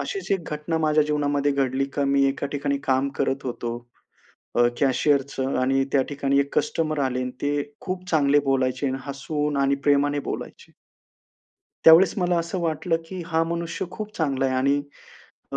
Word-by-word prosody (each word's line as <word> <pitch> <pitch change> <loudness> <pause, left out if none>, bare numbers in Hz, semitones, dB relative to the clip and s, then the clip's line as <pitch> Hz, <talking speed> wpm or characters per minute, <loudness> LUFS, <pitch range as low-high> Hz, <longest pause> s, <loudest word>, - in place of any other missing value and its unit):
अशीच 395 - -5
एक 180 -4 -2
घटना 160 +2 -2
माझ्या 155 -1 +3
जीवनामध्ये 145 -1 0
घडली, 135 0 0
का 140 +1 -2
मी 140 0 +3
एका 140 +1 -2
ठिकाणी 140 0 -1
काम 130 +1 +1
करत 135 +1 -1
होतो, 120 -1 -4 0.8
अ, 120 0 +5
कॅशियरचं 135 0 +1
आणि 135 +1 +2
त्या 135 -2 +4
ठिकाणी 140 -1 +1
एक 140 - -3
कस्टमर 160 -9 -1
आले 130 0 -2
आणि 125 - -3
ते 145 0 0 0.2
खूप 185 -1 -5
चांगले 145 -2 +4
बोलायचे 130 0 0
आणि 130 +1 -2
हसून 145 +1 -2
आणि 140 0 +3
प्रेमाने 145 0 +3
बोलायचे. - - -8 1.1
त्यावेळेस 165 +4 +7
मला 180 -1 +1
असं 170 +2 -3
वाटलं, 165 +1 0
की 185 0 -6
हां, 165 -1 +1
मनुष्य 170 +1 -3
खूप 215 -1 -7
चांगला 135 -4 0
आहे 130 - -1
आणि 140 +2 +2 0.8
अ, - - -1
145 Hz, 165 wpm, -24 LUFS, 135-160 Hz, 1.1 s, त्यावेळेस